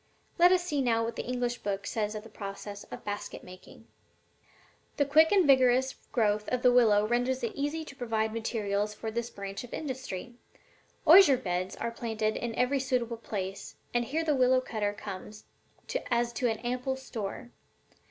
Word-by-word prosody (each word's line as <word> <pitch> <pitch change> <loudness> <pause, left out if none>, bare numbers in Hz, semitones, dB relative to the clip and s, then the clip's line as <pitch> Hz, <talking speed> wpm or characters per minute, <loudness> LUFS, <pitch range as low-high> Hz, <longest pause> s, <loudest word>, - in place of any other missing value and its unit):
Let 355 +1 +7
us 365 -1 +3
see 295 -6 -1
now 230 -3 +2
what 230 0 -3
this - - -5
English 245 -1 -1
book 200 0 -3
says 210 0 -2
of 210 - -5
the - - -11
process 200 0 -7
of - - -10
basket 205 0 -5
making: 185 0 -14 1.1
"'The 285 - +3
quick 310 +3 +5
and 390 -4 +5
vigorous 260 -1 +4 0.2
growth 210 -3 +1
of 250 -1 -1
the 250 - +6
willow 215 -4 +5
renders 245 +3 0
it 230 - -1
easy 295 +3 -2
to 275 - -11
provide 220 -3 -1
materials 210 -2 -1
for 220 - -5
this 235 +1 -3
branch 200 +1 -6
of 245 - -7
industry. 260 -6 -5 0.7
Osier 320 -5 +8
beds 185 -5 -3
are 235 - -3
planted 220 -2 -2
in 235 -1 -3
every 270 +3 +2
suitable 245 -3 -1
place, 195 -3 -5 0.2
and 240 0 +1
here 315 +6 -1
the 310 -2 +2
willow 255 -1 +4
cutter 215 -5 -2
comes 205 +1 -8 0.7
as 235 -1 +1
to 245 0 0
an 220 - -1
ample 250 +2 -2
store. 240 -2 -6
235 Hz, 175 wpm, -29 LUFS, 210-260 Hz, 1.1 s, Osier